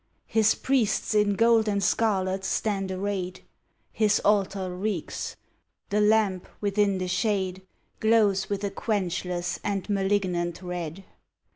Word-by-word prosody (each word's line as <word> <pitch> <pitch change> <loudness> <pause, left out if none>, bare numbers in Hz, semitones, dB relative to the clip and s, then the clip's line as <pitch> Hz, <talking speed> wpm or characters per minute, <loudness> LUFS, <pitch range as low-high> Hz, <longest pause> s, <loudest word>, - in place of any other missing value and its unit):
His 220 -1 +3
priests 250 -5 +1
in 210 -1 +3
gold 230 0 +4
and 200 -1 0
scarlet 190 -2 +1
stand 195 -1 -1
arrayed; 185 -1 -3 0.5
His 210 -2 +2
altar 195 -3 +1
reeks; 190 -3 -3 0.5
the 210 +1 +2
lamp 210 -3 +2
within 200 -1 +1
the 185 0 -2
shade 190 0 0 0.4
Glows 215 -3 +3
with 200 0 -2
a 200 - -1
quenchless 180 -4 -2
and 200 -2 -2
malignant 190 -3 0
red. 180 0 -5
200 Hz, 120 wpm, -26 LUFS, 185-210 Hz, 0.5 s, gold